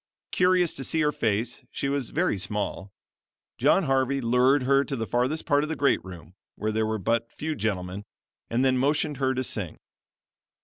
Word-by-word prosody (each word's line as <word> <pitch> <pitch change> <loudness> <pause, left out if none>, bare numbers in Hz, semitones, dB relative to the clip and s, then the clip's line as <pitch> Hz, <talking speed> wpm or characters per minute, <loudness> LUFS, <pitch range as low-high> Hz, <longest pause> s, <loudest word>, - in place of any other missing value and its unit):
Curious 180 -2 +3
to 135 - -6
see 160 +5 0
her 150 -1 +2
face 110 -3 -1
she 140 - -3
was 140 -3 -1
very 100 - 0
small 100 0 -3 0.7
John 150 +9 +4
Harvey 135 -1 +1
lured 125 +3 +3
her 135 +2 +3
to 140 - -4
the 115 -3 -3
farthest 125 +9 -1
part 145 0 +3
of 155 - -3
the 160 - -2
great 140 -2 +2
room 90 -2 -11 0.2
where 110 +1 -2
there 110 0 0
were 110 0 -1
but 115 +4 -1
few 155 +1 -4
gentlemen, 100 -5 -3 0.4
and 120 +3 +1
then 130 -1 +3
motioned 145 +1 +1
her 130 -1 0
to 130 - -1
sing. 100 -9 -2
130 Hz, 185 wpm, -26 LUFS, 110-140 Hz, 0.7 s, John